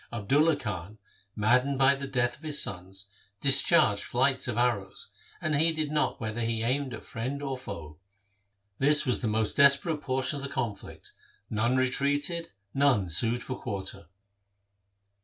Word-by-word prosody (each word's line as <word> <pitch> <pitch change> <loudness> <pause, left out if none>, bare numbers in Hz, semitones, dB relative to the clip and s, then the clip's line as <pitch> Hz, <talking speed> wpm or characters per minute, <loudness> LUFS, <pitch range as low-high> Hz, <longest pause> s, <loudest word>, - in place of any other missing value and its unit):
Abdulla 140 +9 +2
Khan, 105 -4 -6 0.4
maddened 125 +6 +2
by 135 +1 +5
the 140 0 -5
death 120 -2 0
of - - -25
his 150 -2 +1
sons, 95 +1 -1 0.3
discharged 135 -5 +4
flights 130 +2 +1
of 120 -3 -3
arrows, 115 -6 -1 0.3
and 155 -1 0
heeded 155 0 +2
not 150 0 0
whether 110 +1 -4
he 115 -1 -1
aimed 130 +3 -1
at - - -11
friend 130 +5 -5
or 135 -1 -3
foe. 80 - -9 0.8
This 150 +2 +4
was 125 - -1
the 115 - -1
most 110 0 -1
desperate 140 +2 +4
por 130 -2 -2
tion 130 +3 0
of 140 - -7
the 140 - -4
conflict. 115 -8 -6 0.4
None 120 +4 +1
retreated, 145 +6 0 0.2
none 130 -10 +2
sued 115 +7 0
for 130 - -5
quarter. 100 -5 -5
130 Hz, 155 wpm, -28 LUFS, 110-140 Hz, 0.8 s, by